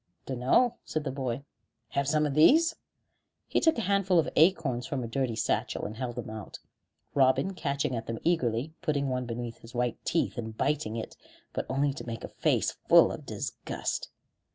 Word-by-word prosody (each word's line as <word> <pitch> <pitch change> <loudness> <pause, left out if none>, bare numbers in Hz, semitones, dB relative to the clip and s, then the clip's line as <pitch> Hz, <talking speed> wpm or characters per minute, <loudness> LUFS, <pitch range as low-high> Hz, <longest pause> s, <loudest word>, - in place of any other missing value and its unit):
"Dunno," 135 - +2
said 155 - -3
the 135 - -2
boy. 130 -1 -3 0.5
"Have 140 0 -1
some 150 +1 +3
of 145 - -1
these?" 320 - +6 0.7
He - - +2
took 320 -4 +3
a - - 0
handful 200 -2 +2
of 165 - +3
acorns 155 -8 +3
from 130 -3 -2
a - - -3
dirty 120 0 -1
satchel, 110 - -1
and 105 - -5
held 120 -1 -3
them 120 - -5
out, 110 -2 -7 0.6
Robin 135 +8 +3
catching 140 -6 -1
at 115 - -4
them 115 - -3
eagerly, 140 -4 +1
putting 145 -5 0
one 125 -1 -2
between 120 0 -4
his 115 +1 -15
white 120 -1 -1
teeth, 165 -6 0
and 110 -1 -6
biting 140 -6 0
it, 115 - -5 0.4
but - - -3
only 140 +1 +1
to 135 - -8
make 115 -1 -5
a - - -4
face - - +1 0.2
full - - +7
of - - -8
disgust. - - -4
135 Hz, 185 wpm, -29 LUFS, 120-155 Hz, 0.7 s, full